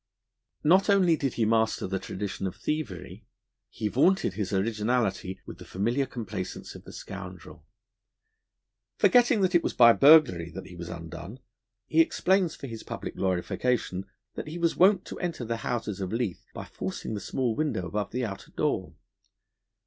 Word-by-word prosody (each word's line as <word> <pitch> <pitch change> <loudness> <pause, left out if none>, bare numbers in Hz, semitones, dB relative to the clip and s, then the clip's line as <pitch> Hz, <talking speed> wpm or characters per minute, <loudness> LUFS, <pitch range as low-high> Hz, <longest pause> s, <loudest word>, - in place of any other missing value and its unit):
Not 185 +6 +4
only 185 -4 +5
did 135 -4 -2
he 115 - +1
master 110 0 +1
the 95 +1 -2
tradition 95 0 -4
of 90 - -6
thievery; 140 - -5 0.4
he 105 - -3
vaunted 155 - +2
his 95 -1 -3
originality 105 -2 0
with - - -10
the - - -9
familiar 120 +8 -1
complacence 105 -6 -6
of - - -12
the - - -10
scoundrel. 90 -5 -9 1.3
Forgetting 245 -3 +5
that 185 -1 +2
it 175 - +5
was - - -3
by 120 -1 +8
burglary 135 - +6
that 95 - -6
he 90 - -11
was 85 0 -7
undone, 85 +5 -8 0.5
he 160 - +4
explains 180 +1 +2
for - - -9
his 115 -4 -7
public - - -6
glorification 95 +1 -1 0.3
that - - -6
he 160 +3 -6
was 170 -1 +1
wont 190 +1 +4
to - - -8
enter 170 -8 -3
the 115 +1 -2
houses 110 -4 -3
of 95 - -3
Leith 115 -6 -3
by - - -7
forcing - - -5
the 105 - -3
small 120 +1 -1
window 150 - -1
above 100 +3 -3
the 125 +4 -2
outer 100 -3 -7
door. - - -2
115 Hz, 165 wpm, -28 LUFS, 95-155 Hz, 1.3 s, by